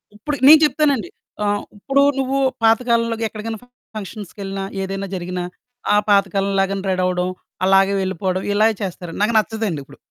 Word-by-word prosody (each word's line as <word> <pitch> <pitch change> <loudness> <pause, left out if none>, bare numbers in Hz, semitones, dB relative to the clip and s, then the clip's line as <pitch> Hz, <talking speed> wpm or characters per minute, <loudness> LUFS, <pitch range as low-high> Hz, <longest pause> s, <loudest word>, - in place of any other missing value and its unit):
ఇప్పుడు 285 +8 -3
నేను 310 +2 +10
చెప్తానండి. 285 - +1 0.4
ఆహ్, 205 0 0
ఇప్పుడు 275 +7 +1 0.2
నువ్వు 270 +1 0 0.3
పాతకాలంలోగా 230 0 +2
ఎక్కడికన్నా 220 +1 -6 0.4
ఫంక్షన్స్‌కెళ్ళిన 195 -1 -6 0.2
ఏదైనా 195 +1 -4
జరిగినా 180 0 -4 0.5
ఆ - - +5
పాతకాలం 200 -1 +2
లాగానే 195 0 0
రెడీ 185 -1 0
అవ్వడం 180 0 0 0.4
అలాగే 195 +1 +4
వెళ్ళిపోవడం 185 0 -2
ఇలాగే 220 +2 +3
చేస్తారండి. 180 -3 -5
నాకు 225 +3 +1
నచ్చదండి 220 -6 -1
ఇప్పుడు. - - -16
200 Hz, 135 wpm, -20 LUFS, 190-225 Hz, 0.5 s, నేను